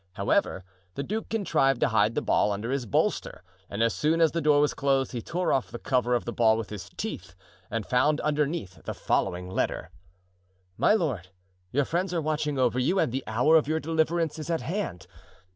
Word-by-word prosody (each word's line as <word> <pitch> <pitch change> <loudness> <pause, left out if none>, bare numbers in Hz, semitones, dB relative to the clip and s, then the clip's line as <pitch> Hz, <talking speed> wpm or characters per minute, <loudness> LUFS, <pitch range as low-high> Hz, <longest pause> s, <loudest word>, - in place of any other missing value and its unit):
However, 100 - 0 0.3
the 140 - -3
duke 215 +8 -4
contrived 135 - +1
to - - +3
hide 110 0 +2
the - - 0
ball 105 - +2
under 105 +5 -3
his 135 -3 -2
bolster 95 - -1 0.3
and 100 +3 -1
as 115 - +2
soon 160 +2 +1
as 165 -2 +4
the 170 - -1
door 150 -2 +4
was 145 0 +2
closed 135 -2 +1
he 120 - -4
tore 180 +8 -1
off 135 - 0
the - - -6
cover 125 0 +1
of 120 - -2
the 120 - -4
ball 110 -2 +4
with 115 -2 -5
his 100 -4 -7
teeth - - -5 0.3
and 110 -1 -3
found 145 +4 +2
underneath 150 - -1
the - - -4
following 90 -1 -1
letter: 95 - -2 0.8
My 210 - +4
Lord,—Your 95 - -3
friends 180 +4 -1
are - - +2
watching 150 -2 -1
over 125 -1 +2
you 165 +10 +1
and 155 - +2
the 130 +2 -3
hour 125 +9 +3
of 155 - +1
your 160 +1 0
deliverance 160 0 0
is 155 +1 -6
at 165 -1 0
hand. 165 - -4
135 Hz, 200 wpm, -27 LUFS, 110-160 Hz, 0.8 s, as